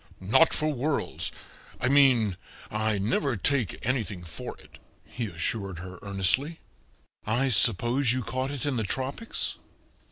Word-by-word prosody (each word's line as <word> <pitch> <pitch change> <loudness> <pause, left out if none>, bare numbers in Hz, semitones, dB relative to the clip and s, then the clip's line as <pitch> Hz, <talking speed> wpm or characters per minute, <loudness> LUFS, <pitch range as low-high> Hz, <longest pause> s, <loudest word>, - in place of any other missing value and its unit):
"Not 105 - +4
for 155 0 0
worlds 140 +3 -2 0.5
I 125 - 0
mean, 130 -8 +4 0.4
I 110 0 0
never 120 +5 0
take 125 - 0
anything 110 -7 -2
for 80 -5 -8
it," - - -17 0.3
he 120 -2 -5
assured 95 +1 -3
her 90 +1 -9
earnestly. 100 - 0 0.6
"I 120 +5 +1
suppose 120 +3 +5
you 130 0 0
caught 130 +3 -3
it 145 0 -3
in 140 -4 -1
the 110 - 0
tropics?" 135 - -3
120 Hz, 135 wpm, -27 LUFS, 100-135 Hz, 0.6 s, suppose